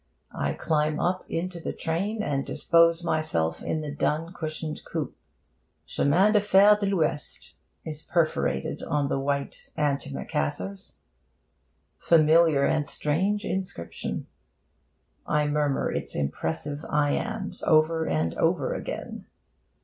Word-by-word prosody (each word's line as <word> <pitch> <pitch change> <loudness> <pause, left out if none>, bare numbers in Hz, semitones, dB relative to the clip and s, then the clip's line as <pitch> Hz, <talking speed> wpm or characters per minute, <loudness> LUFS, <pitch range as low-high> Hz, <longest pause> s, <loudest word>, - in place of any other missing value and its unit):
I - - -1
climb 150 -1 0
up 185 +1 0
into 175 +1 -3
the - - -4
train, 200 +7 -2
and 140 -5 -1
dispose 170 0 +3
myself 85 - 0
in 155 - -2
the 150 -1 -5
dun 160 +4 -1
cushioned 155 -2 -5
coupe'. - - -4 0.7
'Chemins 185 +9 +3
de 210 - +5
Fer 205 +1 +6
de 205 -1 -2
l'Ouest' 160 -6 -1 0.3
is 155 -1 -6
perforated 155 - 0
on 145 -2 0
the 135 - 0
white 140 0 -3
antimacassars. 100 - -2 1.0
Familiar 160 -3 +5
and 150 -2 +1
strange 195 +8 0
inscription! 185 - -4 1.0
I 150 0 +2
murmur 145 -2 0
its - - -4
impressive 80 - -3
iambs 145 -1 -1
over 160 +1 +3
and 80 +1 0
over - - +1
again. - - -6
155 Hz, 115 wpm, -26 LUFS, 145-170 Hz, 1.0 s, Fer